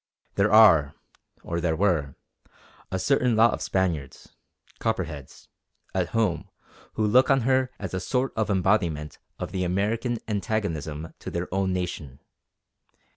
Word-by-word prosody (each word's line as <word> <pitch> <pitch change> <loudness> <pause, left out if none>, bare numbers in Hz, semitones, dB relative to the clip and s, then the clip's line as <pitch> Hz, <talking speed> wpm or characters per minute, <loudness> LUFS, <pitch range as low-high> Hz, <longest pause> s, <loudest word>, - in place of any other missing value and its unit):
There 100 +1 +2
are, 95 -10 +6 0.5
or 85 0 -3
there 80 -2 +1
were, 80 -7 0 0.8
a 95 - -1
certain 125 +4 +2
lot 115 +1 +5
of - - -5
Spaniards 85 -8 -2 0.5
Copperheads 70 -4 -4 0.5
at - - 0
home 115 -2 0 0.4
who 110 - 0
look 125 +5 +4
on 135 -1 +4
her 130 +1 +2
as 95 -2 -6
a 95 - -1
sort 125 +8 -1
of 110 -2 -1
embodiment 90 -6 0 0.2
of - - -5
the 95 -2 -2
American 110 +7 -1
antagonism 85 -8 -3
to - - -7
their 85 +1 -4
own 95 -1 0
nation. 85 -7 -4
95 Hz, 135 wpm, -25 LUFS, 80-110 Hz, 0.8 s, are